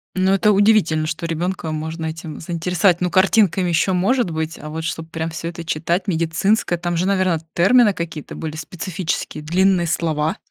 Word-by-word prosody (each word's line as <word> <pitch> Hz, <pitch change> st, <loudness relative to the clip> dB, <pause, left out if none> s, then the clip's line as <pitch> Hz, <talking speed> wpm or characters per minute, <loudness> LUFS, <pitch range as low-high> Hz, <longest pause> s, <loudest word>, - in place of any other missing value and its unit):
Ну, 190 Hz, 0 st, +2 dB
это 205 Hz, +2 st, +3 dB
удивительно, 200 Hz, -6 st, +3 dB
что 165 Hz, +2 st, -4 dB
ребёнка 165 Hz, 0 st, -3 dB
можно 160 Hz, +1 st, -4 dB
этим 160 Hz, 0 st, -7 dB
заинтересовать. 175 Hz, +2 st, +1 dB
Ну, 180 Hz, -1 st, 0 dB
картинками 190 Hz, -1 st, +3 dB
ещё 175 Hz, +3 st, +2 dB
может 200 Hz, +4 st, +1 dB
быть, 160 Hz, +1 st, -3 dB
а 150 Hz, -, -8 dB
вот 160 Hz, +1 st, -5 dB
чтоб 165 Hz, 0 st, -4 dB
прям 165 Hz, 0 st, -3 dB
всё 165 Hz, +1 st, -5 dB
это 170 Hz, 0 st, -7 dB
читать 170 Hz, +4 st, -1 dB
медицинское, 175 Hz, +3 st, +1 dB
там 175 Hz, 0 st, -2 dB
же, 175 Hz, -, +1 dB
наверно, 185 Hz, -4 st, +1 dB
термины 210 Hz, +4 st, +5 dB
какие-то 165 Hz, -4 st, -6 dB
были 155 Hz, -1 st, -5 dB
специфические, 160 Hz, 0 st, -4 dB
длинные 180 Hz, +2 st, +2 dB
слова. 160 Hz, -2 st, -1 dB
170 Hz, 170 wpm, -20 LUFS, 160-185 Hz, -, термины